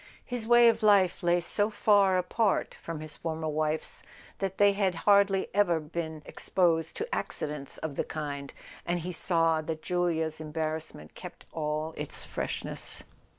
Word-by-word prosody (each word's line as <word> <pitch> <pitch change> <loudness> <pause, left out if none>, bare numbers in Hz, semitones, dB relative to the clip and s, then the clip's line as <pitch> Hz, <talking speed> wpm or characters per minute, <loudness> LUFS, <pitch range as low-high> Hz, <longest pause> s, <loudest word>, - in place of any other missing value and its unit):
His 245 -3 -4
way 240 0 +7
of 230 - +3
life 200 -4 +4
lay 175 0 +3
so 205 +4 0
far 200 -3 +4
apart 205 +3 +1
from 165 -2 -5
his 155 -1 -5
former 160 -1 -3
wife's 155 +1 -1 0.4
that 190 -1 -2
they 205 0 +6
had 195 -3 +1
hardly 200 -1 +5
ever 185 -5 +3
been 160 0 -5
exposed 165 -3 +1
to 450 - -3
accidents 150 -2 -4
of 160 -2 -4
the - - -1
kind, 140 -2 -5 0.3
and 175 0 -1
he 180 +3 -4
saw 165 -2 +2
that 155 0 -5
Julia's 165 -3 0
embarrassment 155 - -4
kept - - -10
all 155 0 -2
its 150 -1 -4
freshness. - - -3
165 Hz, 150 wpm, -29 LUFS, 155-195 Hz, 0.4 s, way